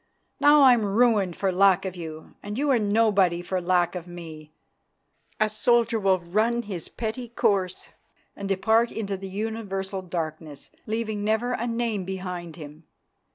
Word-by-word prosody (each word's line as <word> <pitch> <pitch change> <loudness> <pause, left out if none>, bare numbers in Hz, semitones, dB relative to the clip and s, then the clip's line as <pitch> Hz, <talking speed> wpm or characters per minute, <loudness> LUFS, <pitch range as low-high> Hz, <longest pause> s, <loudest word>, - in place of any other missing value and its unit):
Now 290 0 +6
I'm 245 -4 +6
ruined 205 -3 +2
for 195 -1 0
lack 195 0 +4
of 190 -1 -4
you 160 -2 -8
and 210 +2 -6
you 285 +1 +1
are 250 - +4
nobody 205 -5 +2
for 185 +1 -2
lack 175 -1 +2
of 180 -2 -6
me, 160 -3 -10 0.9
a 215 - +3
soldier 230 +1 +2
who 200 - -8
will 190 -1 +4
run 215 +7 0
his 190 -7 -6
petty 235 +2 -5
course 195 -5 0 0.5
and 200 0 -6
depart 220 +4 +2
into 200 -3 -3
the 195 0 -7
universal 195 -2 -4
darkness, 160 -4 -6 0.2
leaving 220 -1 -2
never 220 +3 0
a 240 0 -2
name 230 -4 -1
behind 180 -3 -6
him. 155 -1 -11
195 Hz, 155 wpm, -25 LUFS, 180-225 Hz, 0.9 s, Now